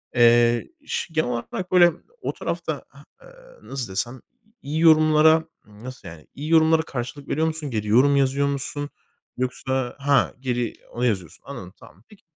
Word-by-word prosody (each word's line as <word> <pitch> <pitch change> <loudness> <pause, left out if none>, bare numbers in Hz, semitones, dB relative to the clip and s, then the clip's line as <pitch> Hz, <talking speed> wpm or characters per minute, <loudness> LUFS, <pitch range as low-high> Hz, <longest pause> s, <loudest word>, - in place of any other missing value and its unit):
eee, 120 0 +4 0.2
ş 165 - -4
genel 155 -6 +1
olarak 150 +10 -4
böyle 175 -2 +7 0.3
o - - -3
tarafta - - -4
ha, - - -17 0.2
aaa, - - -18
nasıl 125 -7 -6
desem 120 +6 -3 0.4
iyi 150 +3 -3
yorumlara, 155 0 +5 0.2
ımm, 105 +1 -16
nasıl 130 -7 -9
yani, 80 -2 -12
iyi 150 +3 -5
yorumlara 160 0 +5
karşılık 135 -1 -6
veriyor 160 +3 0
musun? 160 -2 -4
Geri 105 -2 -2
yorum 130 +6 +5
yazıyor 140 +1 +2
musun 140 +1 -3 0.5
yoksa 130 0 -2
ha, 140 0 +2
geri 125 -3 -2 0.2
onu 120 +1 -2
yazıyorsun. 95 -9 -2
Anladım - - -9
tamam, 90 +7 -18
peki. 210 - -19
135 Hz, 160 wpm, -23 LUFS, 120-160 Hz, 0.5 s, böyle